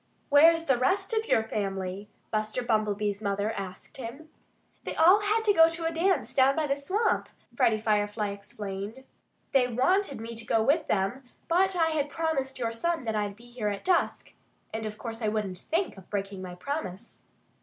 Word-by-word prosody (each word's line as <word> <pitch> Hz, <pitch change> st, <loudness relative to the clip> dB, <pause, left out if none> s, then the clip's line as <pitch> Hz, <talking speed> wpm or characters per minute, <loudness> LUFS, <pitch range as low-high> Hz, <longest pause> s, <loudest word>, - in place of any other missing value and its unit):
"Where's 330 Hz, +3 st, +6 dB
the 265 Hz, -5 st, +2 dB
rest 370 Hz, -, +1 dB
of 445 Hz, 0 st, 0 dB
your 220 Hz, -, +3 dB
family?" 195 Hz, -2 st, -3 dB, 0.2 s
Buster 215 Hz, +3 st, -1 dB
Bumblebee's 210 Hz, -3 st, 0 dB
mother 200 Hz, +1 st, -1 dB
asked 195 Hz, -4 st, -7 dB
him. 265 Hz, +5 st, -8 dB, 0.5 s
"They -, -, -5 dB
all 360 Hz, +6 st, +7 dB
had 425 Hz, +2 st, +1 dB
to 415 Hz, -, +5 dB
go 325 Hz, -3 st, +7 dB
to 330 Hz, 0 st, -3 dB
a 330 Hz, -, 0 dB
dance 330 Hz, -, +1 dB
down 270 Hz, +1 st, +4 dB
by 315 Hz, -, +1 dB
the 275 Hz, -1 st, +1 dB
swamp," 380 Hz, +11 st, 0 dB, 0.3 s
Freddie 220 Hz, -1 st, +3 dB
Firefly 210 Hz, -1 st, 0 dB
explained. 200 Hz, +3 st, -7 dB, 0.5 s
"They 260 Hz, -2 st, +4 dB
wanted 280 Hz, -, +1 dB
me 230 Hz, +1 st, -6 dB
to 225 Hz, 0 st, -6 dB
go 225 Hz, -1 st, +2 dB
with 300 Hz, +6 st, +2 dB
them; 205 Hz, +7 st, -1 dB, 0.2 s
but 375 Hz, +3 st, +3 dB
I 325 Hz, -2 st, +3 dB
had 295 Hz, -2 st, -1 dB
promised 285 Hz, -4 st, -2 dB
your 230 Hz, -2 st, -1 dB
son 330 Hz, +7 st, -1 dB
that 220 Hz, -2 st, -2 dB
I'd 205 Hz, -1 st, -1 dB
be 230 Hz, +3 st, -17 dB
here 240 Hz, -3 st, -4 dB
at 200 Hz, -1 st, -3 dB
dusk. 365 Hz, -2 st, +1 dB, 0.4 s
And 220 Hz, 0 st, -3 dB
of 210 Hz, 0 st, -7 dB
course 225 Hz, 0 st, -6 dB
I 215 Hz, -, 0 dB
wouldn't 210 Hz, -4 st, -2 dB
think 335 Hz, -, -1 dB
of 190 Hz, -, -14 dB
breaking 195 Hz, -1 st, -3 dB
my 180 Hz, -1 st, -7 dB
promise." 235 Hz, -, -6 dB
235 Hz, 185 wpm, -28 LUFS, 210-320 Hz, 0.5 s, all